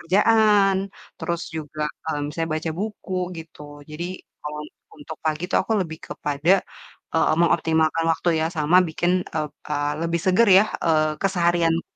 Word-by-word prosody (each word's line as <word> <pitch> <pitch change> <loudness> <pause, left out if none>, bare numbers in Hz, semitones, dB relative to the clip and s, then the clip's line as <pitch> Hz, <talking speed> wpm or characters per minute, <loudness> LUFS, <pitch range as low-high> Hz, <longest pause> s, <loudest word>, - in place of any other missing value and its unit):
kerjaan, 205 +1 +4 0.4
terus 170 +1 -2 0.2
juga, 155 0 -5 0.3
eee, 150 -2 -1
misalnya 165 +2 -3
baca 160 +1 -3
buku 210 -2 -5 0.2
gitu. 165 -2 -12 0.3
Jadi 155 +3 -5 0.4
kalau 150 0 -5
un - - -11 0.3
untuk 150 +2 -8
pagi 155 +1 -1
itu - - +1
aku 225 - -2
lebih 160 -3 -4
kepada, 150 +2 -1 0.6
eee, 160 - +3
mengoptimalkan 160 -1 +2
waktu 175 - -2
ya 160 - +1
sama 155 +4 +3
bikin 175 +3 0 0.2
ep 150 -2 -2 0.2
eee, 145 0 0
lebih 170 0 -1
seger 195 +5 +4
ya, 200 - +5 0.2
eee, 155 -2 +3
keseharian 170 -3 +2
165 Hz, 150 wpm, -23 LUFS, 155-180 Hz, 0.6 s, ya